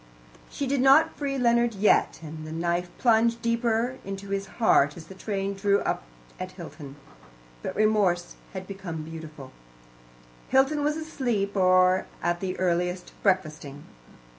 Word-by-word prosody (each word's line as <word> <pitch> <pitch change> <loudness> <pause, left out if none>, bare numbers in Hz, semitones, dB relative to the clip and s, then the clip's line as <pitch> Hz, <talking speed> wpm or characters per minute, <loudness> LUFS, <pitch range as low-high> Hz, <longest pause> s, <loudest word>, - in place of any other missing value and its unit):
She 280 - -3
did 270 0 0
not 275 +4 +5
free 275 -2 -2
Leonard 235 -2 +2
yet, 200 -4 +3
and 155 0 -8
the 155 - -7
knife 170 +2 -1
plunged 230 -1 +3
deeper 235 +2 0
into 195 0 -7
his 195 0 -2
heart 150 - +4
as 165 - -10
the 190 - -11
train 195 0 -3
drew 200 0 +2
up - - -1 0.4
at - - -6
Hilton. 140 -1 -10 0.7
But - - -5
remorse 205 -5 +2 0.2
had 190 -1 -6
become 185 -5 -6
beautiful. 155 -4 -9 1.0
Hilton 275 +3 +3
was 300 +1 +1
asleep, 240 -11 -2
or 185 0 +4 0.2
at 175 0 0
the 185 0 -3
earliest, 180 0 -1
breakfasting. 155 -7 -1
195 Hz, 140 wpm, -26 LUFS, 175-235 Hz, 1.0 s, not